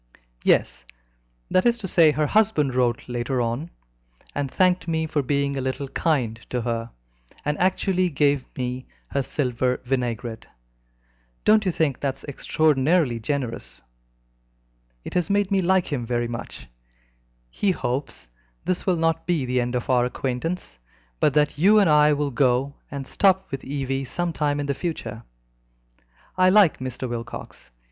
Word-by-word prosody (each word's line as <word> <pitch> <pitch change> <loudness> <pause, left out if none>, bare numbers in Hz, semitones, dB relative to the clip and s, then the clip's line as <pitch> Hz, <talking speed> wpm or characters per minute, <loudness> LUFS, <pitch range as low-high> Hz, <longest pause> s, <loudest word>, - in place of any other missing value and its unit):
"Yes - - +2 0.7
that 185 - +4
is 240 0 +3
to 210 -4 -5
say, 165 -3 +5
her 150 0 0
husband 175 - +2
wrote 125 -2 0
later 125 +1 -2
on, 120 +7 -2 0.6
and 145 -1 -2
thanked 180 +4 +2
me 160 -1 0
for 155 -2 0
being 140 +1 0
a 135 - -2
little 130 +2 -3
kind 130 -10 0
to 125 - -1
her, 115 -1 -2 0.6
and 150 0 0
actually 185 0 +2
gave 145 -2 +2
me 125 0 -4 0.2
her 140 - 0
silver 125 -2 -1
vinaigrette. 120 -3 -3 1.0
Don't 215 0 +5
you - - +3
think 155 -5 0
that 135 -2 -1
is - - -16
extraordinarily 145 -1 +1
generous? 125 0 -4 1.2
It - - -8
has 180 +1 +1
made 200 0 +1
me 195 -1 +3
like 185 -3 +2
him 125 -4 -1
very 120 0 -1
much. 115 0 -7 0.8
He 205 - 0
hopes 125 - -2
that - - -27 0.3
this 185 +1 -1
will 180 -2 +3
not 165 0 0
be 165 -7 +1
the 125 0 +1
end 120 +1 -2
of 125 - -2
our 125 -1 +3
acquaintance, 125 - -3 0.4
but 145 - +2
that 150 -1 +2
you 205 +6 +6
and 200 -3 +5
I 150 -1 +5
will 145 -1 -1
go 130 +2 +1 0.2
and 140 -1 -5
stop 190 +5 +2
with 135 - -4
Evie 135 -1 -2
some 175 +6 -2
time 145 -2 0
in 145 - -2
the 140 - 0
future. 125 - -5 1.2
I 185 0 +6
like 195 -4 +5
Mr. 130 0 -4
Wilcox. 120 - -7
140 Hz, 160 wpm, -24 LUFS, 125-170 Hz, 1.2 s, you